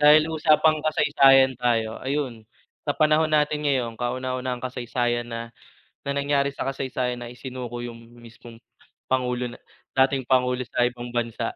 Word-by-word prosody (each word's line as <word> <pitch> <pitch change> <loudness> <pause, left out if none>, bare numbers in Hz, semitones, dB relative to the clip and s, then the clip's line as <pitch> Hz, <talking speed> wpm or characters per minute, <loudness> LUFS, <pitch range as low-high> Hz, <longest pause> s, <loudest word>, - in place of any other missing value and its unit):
Dahil 155 +2 +6
usapang 155 0 +3
kasaysayan 135 -4 +4
tayo 115 -3 0
ayun, 130 -5 -3 0.4
sa 145 - 0
panahon 155 +2 +3
natin 150 -1 +1
ngayong 125 -5 0
kauna-unahang 130 0 -3
kasaysayan 120 -1 -2
na 115 0 -6 0.5
na 140 - -2
nangyari 140 0 +1
sa 135 - -5
kasaysayan 130 -2 -2
na 120 0 -8
isinuko 125 -1 -7
yung 115 -1 -9
mismong 115 0 -14 0.5
pangulo 125 -1 0
na 120 - -10 0.5
dating 135 -2 -1
pangulo 125 -1 +2
sa 125 - 0
ibang 120 0 -3
bansa. 115 -1 -2
125 Hz, 140 wpm, -24 LUFS, 120-140 Hz, 0.5 s, Dahil